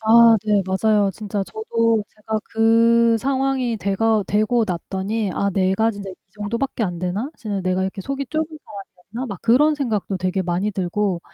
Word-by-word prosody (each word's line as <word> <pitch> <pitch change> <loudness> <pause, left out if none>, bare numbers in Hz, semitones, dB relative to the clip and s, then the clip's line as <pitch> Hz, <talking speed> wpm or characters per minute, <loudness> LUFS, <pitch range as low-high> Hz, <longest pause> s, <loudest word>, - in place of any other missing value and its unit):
아 230 +1 +7
네 210 -2 +2
맞아요. 200 +1 +2
진짜 205 -1 -4
저도 230 - 0
제가 215 0 -4
그 230 +1 +4
상황이 265 -1 0
돼가 215 +2 +1
되고 215 +3 +2
났더니 195 +3 -2
'아 200 +3 0
내가 195 +4 +2
진짜 200 -2 -7
이 - - -10 0.2
정도 210 +2 -4
밖에 265 -2 -2
안 180 -5 -2
되나? 185 - -3
진짜 205 -3 -4
내가 185 0 0
이렇게 190 +1 -3
속이 275 +6 -4
좁은 315 +4 0 0.2
사람이었나?' 200 +4 -9
막 195 -4 -7
그런 295 +7 +4
생각도 220 -8 -2
되게 185 +1 -1
많이 180 +3 -1
들고 190 0 -1
215 Hz, 335 characters per minute, -21 LUFS, 195-230 Hz, 0.2 s, 아